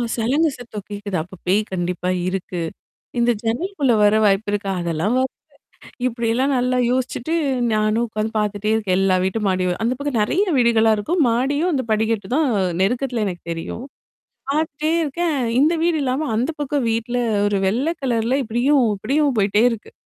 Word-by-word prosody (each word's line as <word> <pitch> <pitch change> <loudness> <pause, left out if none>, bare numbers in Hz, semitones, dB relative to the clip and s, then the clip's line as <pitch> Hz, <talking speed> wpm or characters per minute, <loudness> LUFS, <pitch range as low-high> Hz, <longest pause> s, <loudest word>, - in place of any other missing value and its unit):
சலங்கு 275 +8 +2
சத்தம் 215 -5 -8
கேக்குது. 205 -2 -3
அப்ப 185 +1 -13
பேய் 200 +4 +3
கண்டிப்பா 180 0 -2 0.2
இருக்கு. 185 -2 -3 0.6
இந்த 240 0 +3
ஜன்னலுக்குள்ள 270 - 0
வர 210 +1 +5
வாய்ப்பு 200 +1 +2
இருக்கா? 200 -1 -2
அதெல்லாம் 170 +6 -1
வ - - +3 0.9
இப்டில்லாம் 240 +3 0
நல்லா 250 0 +1
யோசிச்சுட்டு 255 +4 -1 0.4
நானும் 215 +2 +1
உட்காந்து 215 0 -3
பார்த்துட்டே 210 0 -1
இருக்கேன். 200 -4 0
எல்லா 190 -1 +3
வீட்டும் 205 +2 -1
மாடியும். 185 -1 0
அந்த 245 +2 +1
பக்கம் 285 -5 -2
நெறைய 370 - +2
வீடுகளா 225 -2 +4
இருக்கும். 330 - -1
மாடியும் 285 +9 +1
அந்த 260 -4 0
படிகட்டு 220 -2 0
தான் 310 0 +3
அ 190 - +1 0.2
நெருக்கத்துல 240 +1 0
எனக்கு 175 -2 -5
தெரியும். 165 +9 -5 0.7
பார்த்துட்டே 310 +1 -1
இருக்கேன். 315 +1 -1 0.2
இந்த 310 +4 +4
வீடு 335 -2 +2
இல்லாம 265 +4 -1
அந்த 245 +7 0
பக்கம் 285 -3 -1
வீட்ல 230 +2 -2 0.3
ஒரு 205 -1 +1
வெள்ளை 260 - 0
கலர்ல 240 +1 +1
இப்படியும் 255 +5 +2
அப்படியும் 275 +5 +1
போயிட்டே 205 +2 +3
இருக்கு. 220 -2 -7
230 Hz, 155 wpm, -21 LUFS, 205-270 Hz, 0.9 s, வர